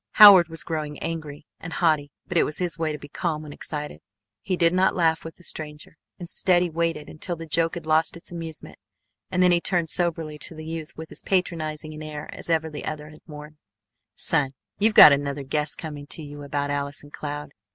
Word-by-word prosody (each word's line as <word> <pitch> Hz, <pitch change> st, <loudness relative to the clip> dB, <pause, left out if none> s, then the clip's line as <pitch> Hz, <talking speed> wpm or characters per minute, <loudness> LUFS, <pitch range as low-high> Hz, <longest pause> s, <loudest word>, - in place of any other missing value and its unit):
Howard 200 Hz, -5 st, +10 dB
was 165 Hz, -1 st, -4 dB
growing 150 Hz, -3 st, -4 dB
angry 155 Hz, -2 st, -5 dB
and 165 Hz, -, -7 dB
haughty, 155 Hz, -4 st, +2 dB, 0.2 s
but 175 Hz, -, -5 dB
it 170 Hz, -, +6 dB
was 150 Hz, -, 0 dB
his 175 Hz, -2 st, -2 dB
way 160 Hz, -1 st, 0 dB
to 150 Hz, -, -4 dB
be 145 Hz, -, -11 dB
calm 155 Hz, +1 st, -3 dB
when 150 Hz, -1 st, -9 dB
excited. 150 Hz, 0 st, -6 dB, 0.4 s
He 185 Hz, -2 st, -2 dB
did 170 Hz, 0 st, +4 dB
not 185 Hz, +1 st, +3 dB
laugh 165 Hz, -2 st, +2 dB
with 165 Hz, -, -8 dB
the 175 Hz, -, -19 dB
stranger. 150 Hz, -1 st, -4 dB, 0.2 s
Instead, 175 Hz, 0 st, +1 dB
he 175 Hz, -, -2 dB
waited 165 Hz, -2 st, -1 dB
until 170 Hz, +3 st, -4 dB
the 165 Hz, 0 st, -8 dB
joke 165 Hz, +2 st, +1 dB
had 170 Hz, -2 st, -7 dB
lost 160 Hz, +1 st, +2 dB
its 170 Hz, -, -8 dB
amusement 165 Hz, -2 st, -7 dB, 0.5 s
and 180 Hz, -, +2 dB
then 180 Hz, -, +5 dB
he 175 Hz, -1 st, +3 dB
turned 175 Hz, -3 st, 0 dB
soberly 165 Hz, -4 st, -1 dB
to 160 Hz, -, -3 dB
the 155 Hz, 0 st, -8 dB
youth 160 Hz, -1 st, -5 dB
with 160 Hz, 0 st, -8 dB
as -, -, -1 dB
patronizing 155 Hz, -5 st, -1 dB
an 155 Hz, -, -9 dB
air 150 Hz, -1 st, -6 dB
as -, -, -6 dB
ever 160 Hz, -1 st, +2 dB
the 150 Hz, -2 st, -7 dB
other 150 Hz, -1 st, -5 dB
had 155 Hz, 0 st, -15 dB
worn: 150 Hz, 0 st, -11 dB, 0.6 s
"Son, 135 Hz, -2 st, +3 dB, 0.2 s
you've 215 Hz, +1 st, +3 dB
got 150 Hz, -, +11 dB
another 140 Hz, 0 st, 0 dB
guess 150 Hz, +2 st, -1 dB
coming 145 Hz, -3 st, -7 dB
to 160 Hz, -, -4 dB
you 145 Hz, 0 st, -9 dB
about 145 Hz, 0 st, -2 dB
Allison 145 Hz, +1 st, -3 dB
Cloud. 145 Hz, -1 st, -6 dB
155 Hz, 215 wpm, -25 LUFS, 150-170 Hz, 0.6 s, got